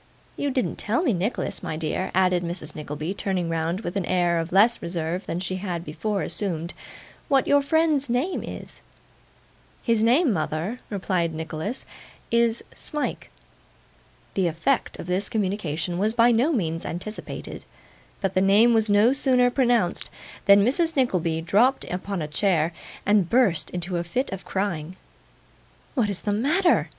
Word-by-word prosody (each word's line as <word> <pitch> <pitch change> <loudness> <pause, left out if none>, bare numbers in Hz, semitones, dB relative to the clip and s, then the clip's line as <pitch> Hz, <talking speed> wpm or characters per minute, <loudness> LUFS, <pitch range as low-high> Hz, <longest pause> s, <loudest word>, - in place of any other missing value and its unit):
You 285 - -1
didn't 255 -2 -1
tell 235 +10 0
me, 265 -10 +2
Nicholas, 195 +6 -2
my 155 - -4
dear,' 165 +4 -2
added 185 -1 +3
Mrs. 170 -3 -5
Nickleby, 150 +3 -4
turning 190 -4 -1
round 165 +3 -1
with 175 -3 -5
an 195 -3 -1
air 175 -2 +2
of 165 +1 -4
less 215 +6 +4
reserve 170 +2 -3
than 170 - -2
she 185 0 -3
had 180 -3 -4
before 195 +7 -2
assumed, 170 -2 -3 0.5
'what 275 -4 +3
your 285 0 +4
friend's 300 -2 +2
name 260 +10 0
is.' - - -8 1.0
'His 230 -2 +2
name, 255 +3 +4
mother,' 165 +7 -2
replied 180 -5 -1
Nicholas, 160 +8 -4 0.5
'is 235 0 +2
Smike.' 300 -2 -4 1.0
The 190 -3 +1
effect 170 - 0
of - - -7
this 185 +3 0
communication 180 -5 -2
was 215 +3 +1
by 235 +1 +5
no 240 +7 +3
means 165 - -1
anticipated; 200 +6 -6 0.6
but 195 -2 0
the 185 - +2
name 210 +5 +5
was 220 -1 +2
no 210 +5 +5
sooner 255 -3 +3
pronounced, 240 -8 +1 0.4
than 200 0 +7
Mrs. 325 +6 +2
Nickleby 180 - +1
dropped 220 +11 +3
upon 185 -1 -3
a - - -3
chair, 165 0 +1 0.3
and 205 -4 +3
burst 230 -9 +2
into 180 0 -3
a 170 - -1
fit 245 +11 -2
of 190 -1 -6
crying. 185 -4 -3 1.0
'What 235 -7 +1
is 200 - -3
the 205 - -1
matter? 310 - +2
195 Hz, 155 wpm, -25 LUFS, 170-235 Hz, 1.0 s, than